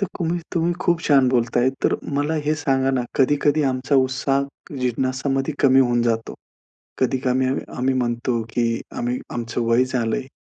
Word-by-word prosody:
तर 195 Hz, -, +1 dB
तुम्ही 170 Hz, 0 st, -1 dB, 0.2 s
तुम्ही 170 Hz, +1 st, +1 dB
खूप 175 Hz, -2 st, +1 dB
छान 135 Hz, -3 st, +5 dB
बोलताय, 120 Hz, 0 st, +2 dB, 0.2 s
तर -, -, +3 dB, 0.2 s
मला 145 Hz, +3 st, 0 dB
हे 155 Hz, +1 st, +1 dB
सांगा 135 Hz, -3 st, +1 dB
ना, 130 Hz, -2 st, 0 dB
कधी-कधी 145 Hz, +2 st, +2 dB
आमचा 130 Hz, +3 st, -1 dB
उत्साह 135 Hz, +1 st, 0 dB, 0.4 s
जिज्ञासामध्ये 135 Hz, +3 st, -1 dB
कमी 135 Hz, -1 st, +5 dB
होऊन 120 Hz, -2 st, +2 dB
जातो. 115 Hz, -1 st, -1 dB, 0.6 s
कधी 130 Hz, 0 st, +1 dB
कमी 130 Hz, +1 st, +2 dB
अ, 130 Hz, -, +1 dB, 0.2 s
आम्ही 130 Hz, +1 st, +1 dB
म्हणतो 120 Hz, -1 st, -1 dB
की 115 Hz, -1 st, 0 dB, 0.2 s
आम्ही 120 Hz, +1 st, -1 dB, 0.2 s
आमचं 120 Hz, 0 st, -3 dB
वय 115 Hz, +2 st, +4 dB
झालंय. 125 Hz, 0 st, -2 dB
130 Hz, 160 wpm, -22 LUFS, 120-140 Hz, 0.6 s, छान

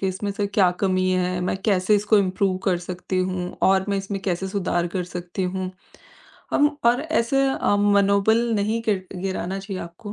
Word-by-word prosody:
कि 190 Hz, -, 0 dB
इसमें 190 Hz, +2 st, -3 dB
सर 205 Hz, 0 st, -1 dB
क्या 185 Hz, -4 st, +5 dB
कमी 185 Hz, -1 st, +2 dB
है? 180 Hz, 0 st, 0 dB
मैं 180 Hz, +1 st, -1 dB
कैसे 200 Hz, -1 st, +2 dB
इसको 210 Hz, +1 st, +3 dB
इम्प्रूव 190 Hz, 0 st, +1 dB
कर 180 Hz, -2 st, +2 dB
सकती 185 Hz, +1 st, -3 dB
हूँ 185 Hz, -1 st, -2 dB
और 190 Hz, 0 st, +4 dB
मैं 200 Hz, -1 st, 0 dB
इसमें 195 Hz, 0 st, -4 dB
कैसे 190 Hz, 0 st, -2 dB
सुधार 180 Hz, -3 st, -1 dB
कर 180 Hz, -, -1 dB
सकती 180 Hz, +1 st, -5 dB
हूँ? 185 Hz, 0 st, -2 dB, 0.8 s
अम 290 Hz, -, +4 dB, 0.2 s
और 245 Hz, +2 st, +4 dB
ऐसे 275 Hz, -4 st, +1 dB
अ, 235 Hz, -5 st, +1 dB
मनोबल 200 Hz, +1 st, +3 dB, 0.2 s
नहीं 215 Hz, +2 st, 0 dB
गिर 190 Hz, -3 st, 0 dB, 0.2 s
गिराना 190 Hz, 0 st, -3 dB
चाहिए 195 Hz, -1 st, -6 dB
आपको, 175 Hz, +5 st, -9 dB
195 Hz, 185 wpm, -23 LUFS, 185-205 Hz, 0.8 s, क्या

